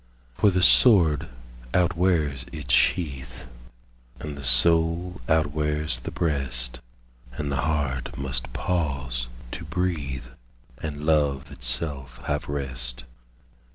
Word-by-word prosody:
For 105 - +3
the 90 -1 +1
sword 85 - +5 0.5
outwears 85 -6 +1
its 70 -7 -3
sheath, 65 -3 +1 0.7
And 75 -2 -6
the 70 - -8
soul 85 +7 +3
outwears 75 -3 +1
the - - -5
breast, 65 -7 -1 0.5
And 70 +3 -4
the 70 - -1
heart 70 -5 -2
must 65 -3 -3
pause 70 -9 -2 0.2
to - - -6
breathe, 75 -7 -2 0.6
And 75 -1 -5
love 75 -2 +1
itself 65 0 -3
have - - -2
rest. 65 -4 -3
75 Hz, 105 wpm, -25 LUFS, 65-80 Hz, 0.7 s, sword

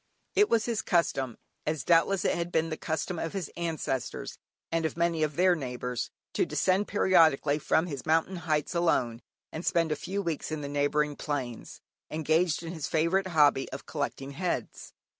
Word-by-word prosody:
It 415 - +4
was 225 -1 +3
his 235 -3 -1
custom 135 - 0 0.3
(as 155 -1 -1
doubtless 175 +3 +3
it - - +3
had 170 0 -2
been 165 -1 +1
the - - -1
custom 160 +2 -3
of 165 - -3
his 195 -4 -4
ancestors, 160 -6 -3 0.3
and 165 0 +1
of 160 - -2
many 170 -1 +1
of 155 -2 0
their 180 +2 +5
neighbours) 125 -5 -3 0.2
to - - +2
descend 190 +2 +1
periodically 160 -7 +4
from 160 +2 +2
his 140 -7 -5
mountain 165 +4 +1
heights 155 -2 -1
alone 130 -9 +1 0.3
and 160 - -5
spend 170 -4 +2
a - - +2
few 200 +5 -3
weeks 165 -3 -3
in 155 -1 -3
the 140 - -4
neighbouring 145 +1 +1
plains, 135 -6 -5 0.3
engaged 160 +2 +1
in 165 +1 -5
his 160 -4 -4
favourite 170 +4 +1
hobby 150 -6 +3
of 135 - -7
collecting 140 -2 -4
heads. 175 +5 -3
160 Hz, 180 wpm, -29 LUFS, 145-175 Hz, 0.3 s, their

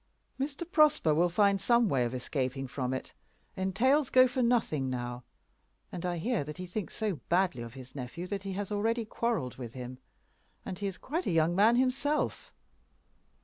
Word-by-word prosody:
Mr. 280 +4 -2
Prosper 305 - +4
will 175 +3 +3
find 200 +2 +3
some 235 +2 +4
way 135 -9 +2
of 120 +2 -3
escaping 130 +1 -2
from 130 0 -3
it. 130 - -4 0.4
Entails 245 +10 +2
go 255 0 +7
for 255 +1 -2
nothing 225 - +1
now; 120 -1 -4 0.7
and 180 0 -4
I 175 -1 -1
hear 220 - 0
that 150 +1 -8
he 185 - -5
thinks 185 +2 -5
so 215 -7 -1
badly 175 -8 +2
of 115 +1 -8
his 130 -1 -11
nephew 135 +6 -6
that 195 +1 -3
he 195 0 -5
has 200 +1 -4
already 225 +3 0
quarrelled 220 - -2
with 120 -3 -7
him. 125 0 -7 0.7
And 185 -2 -5
he 200 - -1
is 195 - -5
quite 330 +7 -3
a - - +1
young 165 +1 +3
man 215 +5 +5
himself. 260 +4 0
190 Hz, 185 wpm, -30 LUFS, -, 0.7 s, go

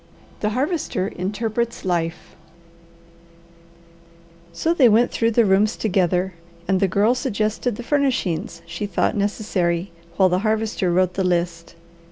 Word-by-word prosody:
THE 210 - 0
HARVESTER 270 - -1
INTERPRETS 220 +5 -3
LIFE 170 -2 -2 2.4
They 260 -7 +6
went 225 +3 +4
through 230 - +1
the 230 0 +3
rooms 205 +3 +3
together, 185 -2 0 0.3
and 190 0 +2
the 195 - +3
Girl 205 +6 +3
suggested 220 -2 -1
the 240 - -7
furnishings 235 - -1
she 175 +4 -5
thought 190 - 0
necessary, 195 -4 -1 0.3
while 190 - +5
the 180 +1 +1
Harvester 215 -3 0
wrote 180 +1 +2
the 190 - -1
list. 170 -2 -1
200 Hz, 125 wpm, -22 LUFS, 180-225 Hz, 2.4 s, They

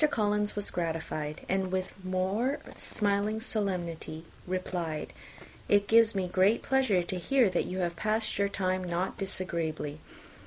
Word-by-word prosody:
Collins 210 -4 +1
was 205 -1 0
gratified; 160 -3 -3
and 190 -1 0
with 185 0 -1
a - - -7
more 195 +9 +1 0.2
smiling 205 +1 +1
solemnity 175 -8 -2 0.2
replied, 175 -4 -3 0.6
"It 205 0 +4
gives 230 0 +6
me 190 -1 +1
the 180 - -8
greatest 195 +5 +4
pleasure 255 -9 +3
to 180 +1 -4
hear 245 +1 +3
that - - +1
you 185 - -4
have 170 -1 -1
passed 215 +2 0
your 200 0 +3
time 185 -1 0
not 175 +1 -2
disagreeably. 165 -6 -3
185 Hz, 150 wpm, -30 LUFS, 175-210 Hz, 0.6 s, gives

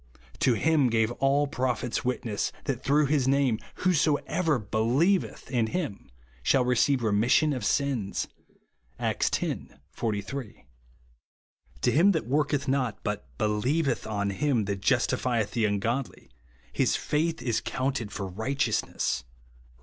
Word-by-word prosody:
To 125 - +3
him 150 0 +3
gave 110 0 +2
all 140 +2 +3
the 140 - -9
pro 130 -1 +2
phets 120 +1 -3
witness, 125 -4 -1
that 130 -3 -2
through 145 +2 +3
his 140 -2 +1
name 135 -5 +2 0.3
who^ 185 - +5
soever 155 0 +1
helieveth 120 - 0
in 120 -4 +1
him 135 - -4 0.3
shall 125 - +3
receive 125 +1 +2
remis 110 +3 +2
sion 155 -2 +4
of 125 -5 -4
sins," 125 -5 0 0.7
(Acts - - 0
x. - - -4 0.2
43). 110 - -4 0.5
" 65 +1 -32
To - - +4
him 185 +7 +5
that 160 - -1
worketh 145 +1 0
not, 130 -4 -1
but 105 -1 -3
helieveth 120 +7 0
on 100 -2 -1
him 120 0 +1
that 100 -1 -3
jus 120 +4 +3
tifieth 120 -4 0
the 115 -2 +1
ungodly, 115 +6 -2 0.4
his - - +2
faith 160 +2 0
is 120 -2 -1
counted 130 -5 -2
for 100 - -4
righteousness/' 110 - -1
(Rom. - - -32
125 Hz, 145 wpm, -27 LUFS, 110-140 Hz, 0.7 s, who^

